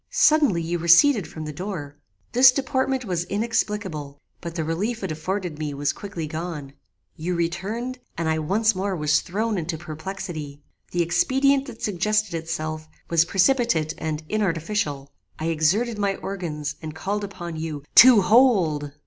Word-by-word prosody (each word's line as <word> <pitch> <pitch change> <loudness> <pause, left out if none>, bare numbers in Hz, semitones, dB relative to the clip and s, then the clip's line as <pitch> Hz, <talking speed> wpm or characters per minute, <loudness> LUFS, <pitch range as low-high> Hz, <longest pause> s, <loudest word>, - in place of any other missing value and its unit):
"Suddenly 305 - +3
you 170 +1 -2
receded 180 - +5
from 155 -1 -8
the 150 - -5
door. 150 -4 -6 0.4
This 255 +1 +7
deportment 260 0 -1
was 175 -3 -2
inexplicable, 200 -8 -2 0.2
but 170 -1 -6
the 165 - -1
relief 200 +9 -2
it 190 - -2
afforded 170 +1 -3
me 150 -2 -3
was 145 +1 0
quickly 195 -6 -6
gone. 155 -3 -6 0.4
You 175 +3 -3
returned, 200 +10 -3 0.2
and 165 -1 -1
I 160 0 +1
once 215 +8 +2
more 190 0 -2
was 150 -2 +2
thrown 210 +2 -2
into 160 0 -3
perplexity. 155 -3 -7 0.3
The 175 -1 +1
expedient 270 - +2
that 230 -3 -10
suggested 210 +1 0
itself 155 -1 -4 0.2
was 165 -1 +4
precipitate 190 - +2
and 155 0 -3
inartificial. 165 -7 -1 0.3
I 160 +1 -2
exerted 200 +9 +1
my 200 -1 +1
organs 155 -7 -5
and 155 -1 -7
called 200 +5 -3
upon 175 -4 -6
you 155 -3 -5
TO 245 -4 +9
HOLD. 185 - +3
175 Hz, 150 wpm, -24 LUFS, 155-215 Hz, 0.4 s, TO